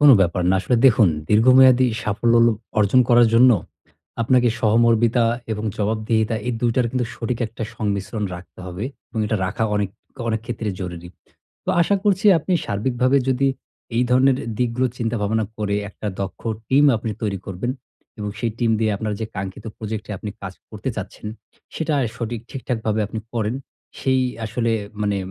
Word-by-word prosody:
কোন 145 Hz, -1 st, +8 dB
ব্যাপার 90 Hz, -1 st, +2 dB
না। -, -, +4 dB
আসলে 125 Hz, -, +1 dB
দেখুন 110 Hz, -5 st, +6 dB, 0.2 s
দীর্ঘমেয়াদী 130 Hz, +3 st, +6 dB, 0.2 s
সাফল্য 115 Hz, +3 st, +1 dB, 0.4 s
অর্জন 105 Hz, +5 st, +4 dB
করার 120 Hz, -1 st, +6 dB
জন্য 125 Hz, +2 st, +7 dB, 0.7 s
আপনাকে 125 Hz, +1 st, +3 dB
সহমর্মিতা 115 Hz, +1 st, +3 dB, 0.3 s
এবং 105 Hz, 0 st, -4 dB
জবাবদিহিতা 110 Hz, +1 st, 0 dB
এই -, -, +1 dB
২ 120 Hz, -, +2 dB
টার 125 Hz, -2 st, +2 dB
কিন্তু 125 Hz, -2 st, 0 dB
সঠিক 115 Hz, 0 st, -3 dB
একটা 110 Hz, +1 st, -8 dB
সংমিশ্রণ 105 Hz, +1 st, -2 dB
রাখতে 90 Hz, +1 st, -12 dB
হবে। 90 Hz, +5 st, -5 dB, 0.3 s
এবং 115 Hz, -, -2 dB
এটা 110 Hz, +1 st, 0 dB
রাখা 115 Hz, +5 st, -1 dB
অনেক, 105 Hz, -1 st, 0 dB, 0.4 s
অনেক 110 Hz, -1 st, 0 dB
ক্ষেত্রে 115 Hz, -3 st, -3 dB
জরুরি। 90 Hz, -2 st, -6 dB, 0.6 s
তো -, -, 0 dB
আশা 200 Hz, +4 st, +2 dB
করছি 205 Hz, 0 st, +2 dB
আপনি 175 Hz, +4 st, -3 dB
সার্বিকভাবে 125 Hz, +5 st, +1 dB
যদি 135 Hz, +1 st, +2 dB, 0.5 s
এই 120 Hz, -, +4 dB
ধরনের 130 Hz, +1 st, +4 dB, 0.2 s
দিকগুলো 125 Hz, +1 st, +1 dB
চিন্তা-ভাবনা 110 Hz, -1 st, 0 dB
করে 100 Hz, -1 st, 0 dB
একটা 105 Hz, -, -8 dB
দক্ষ 95 Hz, -1 st, -4 dB, 0.3 s
টিম 140 Hz, +2 st, +5 dB
আপনি 110 Hz, 0 st, -4 dB
তৈরি 100 Hz, -2 st, -1 dB
করবেন। 95 Hz, +6 st, -3 dB, 0.5 s
এবং 105 Hz, -1 st, -3 dB
সেই 115 Hz, -, 0 dB
টিম 120 Hz, -2 st, +2 dB
দিয়ে 110 Hz, -1 st, +2 dB
আপনার 105 Hz, +1 st, -3 dB
যে 110 Hz, -, -2 dB
কাঙ্ক্ষিত 95 Hz, 0 st, -6 dB
প্রজেক্ট 110 Hz, 0 st, -5 dB
এ -, -, -2 dB
আপনি 105 Hz, -, -5 dB
কাজ 95 Hz, -2 st, -5 dB, 0.2 s
করতে 110 Hz, +3 st, -5 dB
চাচ্ছেন, 105 Hz, +1 st, -7 dB, 0.5 s
সেটায় 150 Hz, -5 st, 0 dB
সঠিক 115 Hz, -1 st, -4 dB
ঠিকঠাকভাবে 110 Hz, -4 st, -2 dB
আপনি 110 Hz, -, -5 dB
করেন। 115 Hz, -1 st, -1 dB, 0.4 s
সেই 130 Hz, -1 st, +2 dB, 0.2 s
আসলে 115 Hz, +1 st, -1 dB, 0.3 s
মানে 100 Hz, -1 st, +1 dB
115 Hz, 160 wpm, -22 LUFS, 105-125 Hz, 0.7 s, কোন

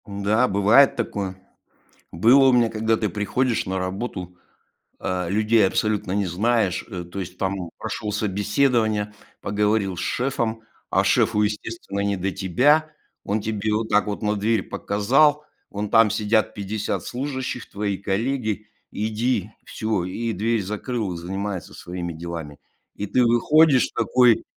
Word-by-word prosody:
М-да, 105 Hz, +4 st, +1 dB
бывает 105 Hz, +9 st, +5 dB
такое. 100 Hz, -6 st, -3 dB, 0.8 s
Было 120 Hz, +10 st, +5 dB
у -, -, +6 dB
меня, 120 Hz, -2 st, +4 dB
когда 110 Hz, 0 st, 0 dB
ты 105 Hz, -1 st, -1 dB
приходишь 110 Hz, +6 st, 0 dB
на 95 Hz, 0 st, -2 dB
работу, 95 Hz, -1 st, -4 dB, 0.6 s
э, 90 Hz, -2 st, -2 dB
людей 110 Hz, +2 st, +3 dB
абсолютно 105 Hz, -1 st, -1 dB
не 100 Hz, 0 st, +1 dB
знаешь, 105 Hz, +2 st, 0 dB
э, 90 Hz, -5 st, -5 dB
то 90 Hz, +3 st, -7 dB
есть 90 Hz, -1 st, -6 dB
там 95 Hz, -2 st, -2 dB
прошел 105 Hz, 0 st, -4 dB
собеседование, 105 Hz, +1 st, +1 dB, 0.3 s
поговорил 105 Hz, -1 st, 0 dB
с -, -, -3 dB
шефом, 115 Hz, -3 st, -1 dB, 0.3 s
а -, -, +2 dB
шефу, 105 Hz, -, +2 dB
естественно, 105 Hz, -1 st, -4 dB
не 100 Hz, 0 st, 0 dB
до 95 Hz, +2 st, -2 dB
тебя. 145 Hz, -, +2 dB, 0.3 s
Он 105 Hz, +2 st, -1 dB
тебе 110 Hz, 0 st, -2 dB
вот 110 Hz, +1 st, -1 dB
так 105 Hz, 0 st, +3 dB
вот 105 Hz, -, -4 dB
на 105 Hz, 0 st, +1 dB
дверь 105 Hz, 0 st, +1 dB
показал: 140 Hz, +9 st, +2 dB, 0.2 s
"Вон 105 Hz, +1 st, -4 dB
там 115 Hz, 0 st, +5 dB
сидят 110 Hz, +1 st, +1 dB
50 105 Hz, +1 st, -3 dB
служащих- 130 Hz, -1 st, -4 dB
твои 100 Hz, -1 st, -2 dB
коллеги, 110 Hz, +1 st, -2 dB, 0.2 s
иди, 110 Hz, 0 st, -1 dB
всё". 110 Hz, -4 st, -2 dB
И 115 Hz, +5 st, -3 dB
дверь 110 Hz, +3 st, 0 dB
закрыл, 105 Hz, 0 st, -3 dB
занимается 95 Hz, +2 st, -5 dB
своими 85 Hz, -1 st, -6 dB
делами, 80 Hz, -3 st, -7 dB, 0.4 s
и 105 Hz, -, -4 dB
ты 125 Hz, +5 st, +2 dB
выходишь 130 Hz, +4 st, +4 dB
такой. 125 Hz, -2 st, +4 dB
105 Hz, 140 wpm, -23 LUFS, 95-115 Hz, 0.8 s, у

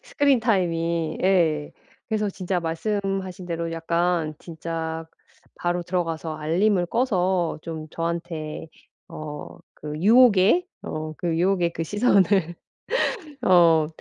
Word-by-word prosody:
스크린 285 Hz, -, +2 dB
타임이. 170 Hz, -6 st, 0 dB
예. 165 Hz, -6 st, +2 dB, 0.4 s
그래서 215 Hz, -2 st, 0 dB
진짜 185 Hz, -1 st, -2 dB
말씀하신 190 Hz, +1 st, -3 dB
대로 170 Hz, -1 st, -3 dB
약간 170 Hz, -1 st, 0 dB
진짜 165 Hz, -1 st, -5 dB, 0.5 s
바로 175 Hz, 0 st, -1 dB
들어가서 165 Hz, -3 st, -2 dB
알림을 175 Hz, +4 st, +1 dB
꺼서 185 Hz, -7 st, 0 dB
좀 160 Hz, -1 st, -6 dB
저한테 165 Hz, -2 st, -4 dB, 0.4 s
어 150 Hz, -1 st, -8 dB, 0.2 s
그 150 Hz, 0 st, -6 dB
유혹의, 225 Hz, -, +5 dB, 0.2 s
어 155 Hz, 0 st, -5 dB
그 170 Hz, -2 st, -1 dB
유혹의 175 Hz, -1 st, +2 dB
그 165 Hz, -, -2 dB
시선을 195 Hz, -3 st, +2 dB, 0.9 s
어 165 Hz, -5 st, +5 dB
175 Hz, 225 characters per minute, -24 LUFS, 165-195 Hz, 0.9 s, 유혹의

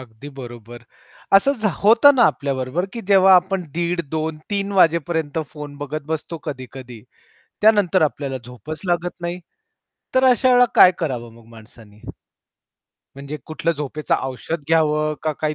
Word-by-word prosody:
अगदी 125 Hz, +2 st, -12 dB
बरोबर. 120 Hz, -1 st, -10 dB, 0.5 s
असं 275 Hz, +8 st, +3 dB
झ 215 Hz, -, +2 dB, 0.2 s
होत 230 Hz, +6 st, +5 dB
ना 245 Hz, -, +4 dB
आपल्या 140 Hz, -1 st, -4 dB
बरोबर, 130 Hz, +8 st, -2 dB
की 235 Hz, -, -6 dB
जेव्हा 190 Hz, -1 st, +6 dB
आपण 185 Hz, 0 st, +1 dB
दीड, 175 Hz, 0 st, -1 dB
2:00, 160 Hz, 0 st, -3 dB
3:00 200 Hz, 0 st, -2 dB
वाजेपर्यंत 160 Hz, -2 st, +1 dB
फोन 150 Hz, -2 st, -9 dB
बघत 155 Hz, +2 st, -5 dB
बसतो 160 Hz, +1 st, -5 dB
कधी-कधी. 130 Hz, -4 st, -9 dB, 0.6 s
त्यानंतर 205 Hz, -5 st, +4 dB
आपल्याला 140 Hz, -3 st, -2 dB
झोपच 125 Hz, +6 st, -9 dB
लागत 175 Hz, 0 st, -2 dB
नाही, 175 Hz, +1 st, -4 dB, 0.7 s
तर 260 Hz, 0 st, +3 dB
अशा 250 Hz, +1 st, +2 dB
वेळेला 245 Hz, -1 st, +6 dB
काय 180 Hz, -, +8 dB
करावं 125 Hz, -8 st, -4 dB
मग 115 Hz, -, -18 dB
माणसानी? 110 Hz, -1 st, -17 dB, 1.2 s
म्हणजे 140 Hz, +2 st, -7 dB
कुठलं 165 Hz, +1 st, -2 dB
झोपेचं 150 Hz, 0 st, -3 dB
औषध 140 Hz, +5 st, -5 dB
घ्यावं 155 Hz, -1 st, +2 dB
का? 155 Hz, -, -1 dB
काय 155 Hz, +1 st, -3 dB
155 Hz, 145 wpm, -20 LUFS, 135-180 Hz, 1.2 s, काय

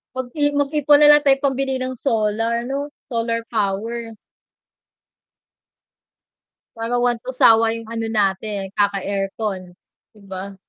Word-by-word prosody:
Mag 260 Hz, -1 st, -4 dB
i -, -, +2 dB
mag-ipon 290 Hz, +1 st, +3 dB
lang 295 Hz, 0 st, +8 dB
tayo 275 Hz, -1 st, +4 dB
pambili 270 Hz, -1 st, 0 dB
ng 255 Hz, 0 st, -3 dB
solar, 225 Hz, -1 st, 0 dB
'no? 275 Hz, +3 st, -3 dB, 0.2 s
Solar 230 Hz, 0 st, -1 dB
power. 225 Hz, +2 st, -2 dB, 2.6 s
Para 230 Hz, +2 st, -2 dB
one 240 Hz, -1 st, +1 dB
to 255 Hz, -, -5 dB
sawa 225 Hz, -3 st, +4 dB
yung 230 Hz, -1 st, -6 dB
ano 225 Hz, 0 st, -4 dB
natin, 200 Hz, -1 st, -1 dB
kaka-aircon, 195 Hz, -1 st, -2 dB, 0.4 s
'di 215 Hz, -, -21 dB
ba? 190 Hz, +1 st, -7 dB
230 Hz, 120 wpm, -20 LUFS, 205-260 Hz, 2.6 s, lang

